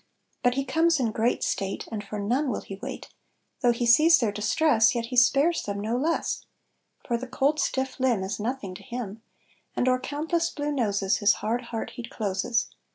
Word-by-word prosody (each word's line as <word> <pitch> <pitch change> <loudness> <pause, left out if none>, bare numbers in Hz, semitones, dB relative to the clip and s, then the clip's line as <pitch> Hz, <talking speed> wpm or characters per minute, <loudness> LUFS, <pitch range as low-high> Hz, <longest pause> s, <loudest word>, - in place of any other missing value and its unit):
But 245 -1 +2
he 275 0 -1
comes 325 +4 +2
in 235 -4 +1
great 225 +3 0
state, 195 0 -2
And 210 -2 -4
for 210 +1 -6
none 245 +8 0
will - - -2
he 195 - -8
wait, - - -7 0.5
Though 245 -3 +4
he 240 0 -1
sees 310 +8 +7
their 230 -4 0
distress 225 +4 +3
Yet 235 -1 -1
he 250 - -6
spares 280 +7 +4
them 200 0 -4
no 220 +3 -1
less, 310 +7 -1 0.6
For 235 - +1
the 255 - -6
cold 280 +4 +1
stiff 265 0 -1
limb 245 -7 +2
Is 195 +3 -4
nothing 215 -3 -3
to 185 - -10
him; 235 -4 -6 0.5
And 250 - 0
o'er 255 0 +3
countless 320 +5 -1
blue 295 0 -3
noses, 200 -7 +1
His 205 0 +4
hard 235 +3 -1
heart 230 -1 -5
he - - -4
closes. 215 0 -1
240 Hz, 195 wpm, -26 LUFS, 215-275 Hz, 0.6 s, sees